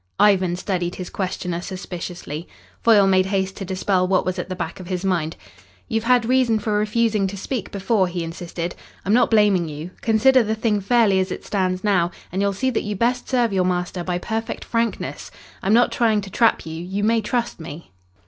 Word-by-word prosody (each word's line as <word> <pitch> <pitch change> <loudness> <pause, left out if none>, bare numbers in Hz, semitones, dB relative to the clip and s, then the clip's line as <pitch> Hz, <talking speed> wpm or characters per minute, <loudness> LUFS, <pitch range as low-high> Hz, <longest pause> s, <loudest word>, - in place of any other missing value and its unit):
Ivan 190 -4 +4
studied 180 -2 -2
his 185 - -7
questioner 180 -2 -3
suspiciously. 175 -3 -6 0.3
Foyle 215 -4 +6
made 190 -1 +3
haste 190 -1 -1
to 195 - -5
dispel 185 0 0
what 185 0 +2
was 185 0 -2
at 180 - -4
the 185 - -3
back 170 0 -5
of 185 - -9
his 185 0 -3
mind. 170 -4 0 0.5
"You 225 -2 0
had 245 0 +3
reason 250 -2 +3
for 215 0 -2
refusing 210 -1 +1
to 200 +1 -6
speak 225 +3 -4
before," 200 -1 +1
he 175 -1 -3
insisted. 170 +1 -5 0.3
"I'm 200 - +2
not 245 - +4
blaming 205 -6 +3
you. 155 +4 -7
Consider 250 +4 +4
the 220 -1 -1
thing 215 -2 0
fairly 210 -2 +3
as 185 0 -1
it - - -6
stands 185 -2 -1
now 185 -5 +2 0.2
and 190 +3 -1
you'll 200 0 +2
see 260 +7 -1
that 230 - 0
you 210 0 -3
best 245 +4 0
serve 240 -5 +2
your 185 -1 +2
master 180 0 -1
by 180 0 -1
perfect 225 +5 -4
frankness. 230 -1 -2 0.3
I'm 195 - +2
not 240 +1 +4
trying 220 -3 +2
to 195 -1 -9
trap 230 +3 +2
you. 160 +1 -6
You 195 +3 -3
may 225 +1 +3
trust 235 0 -2
me." 160 - -9
195 Hz, 205 wpm, -22 LUFS, 180-225 Hz, 0.5 s, Foyle